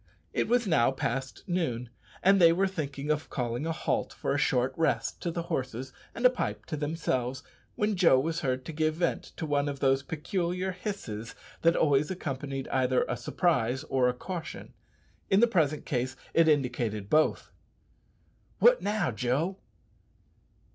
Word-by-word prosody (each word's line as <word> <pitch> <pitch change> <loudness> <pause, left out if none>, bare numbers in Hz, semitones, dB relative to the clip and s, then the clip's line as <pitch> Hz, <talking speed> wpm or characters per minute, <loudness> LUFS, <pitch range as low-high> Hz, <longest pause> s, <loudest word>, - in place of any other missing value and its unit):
It - - 0
was 240 +1 +2
now 160 - +4
past 135 0 -3
noon, 125 - -2 0.3
and 195 0 +5
they 165 -1 +8
were 185 +4 +2
thinking 145 -5 -3
of 155 +1 -2
calling 125 +4 -2
a - - 0
halt 160 - -1
for - - -2
a - - +1
short 130 +1 +1
rest 140 -9 0
to 175 - -1
the 170 0 -3
horses 130 -6 -4 0.2
and 235 - -2
a - - +10
pipe 105 - -3
to - - -4
themselves, 145 -4 -2 0.3
when 210 0 +1
Joe 170 -8 +5
was 165 +5 -1
heard 130 -4 -2
to 160 - -6
give 155 0 +1
vent 170 +1 -1
to - - -3
one 145 -1 +1
of 140 -1 -5
those 135 0 +3
peculiar 180 +4 -2
hisses 180 - -6 0.3
that 165 +1 +4
always 145 -1 +3
accompanied 135 -6 -4
either 130 -1 +2
a 120 - -1
surprise 125 -1 0
or 130 -2 +3
a - - 0
caution. 175 +5 -7 0.6
In 195 - +5
the 235 - +7
present 155 -10 +1
case 130 0 -1 0.2
it 165 -1 +5
indicated 120 -8 0
both. 155 +7 +2 1.1
"What - - +5
now, 205 -8 0
Joe?" 130 - -1
150 Hz, 165 wpm, -29 LUFS, 130-175 Hz, 1.1 s, a